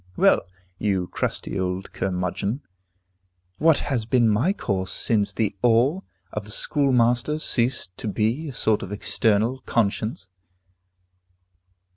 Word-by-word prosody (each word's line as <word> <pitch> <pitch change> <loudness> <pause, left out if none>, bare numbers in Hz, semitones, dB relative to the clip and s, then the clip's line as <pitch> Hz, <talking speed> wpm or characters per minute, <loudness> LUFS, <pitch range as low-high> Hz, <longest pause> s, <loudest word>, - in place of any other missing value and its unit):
Well, - - +5 0.4
you 95 -4 0
crusty 95 - -3
old 95 +1 -3
curmudgeon, 95 - -2 1.0
what 160 -1 +5
has 120 -6 -1
been 120 -1 +3
my 110 - +2
course 95 - -2
since 105 -2 +1
the 105 0 -1
awe 125 +9 +3 0.3
of 105 - -3
the - - -9
schoolmaster 125 +2 +2
ceased 120 -10 0
to - - -4
be 115 +9 -1
a - - -7
sort 110 -3 +1
of 95 - -7
external 110 +3 +1
conscience? 110 -3 -1
110 Hz, 120 wpm, -24 LUFS, 100-125 Hz, 1.0 s, Well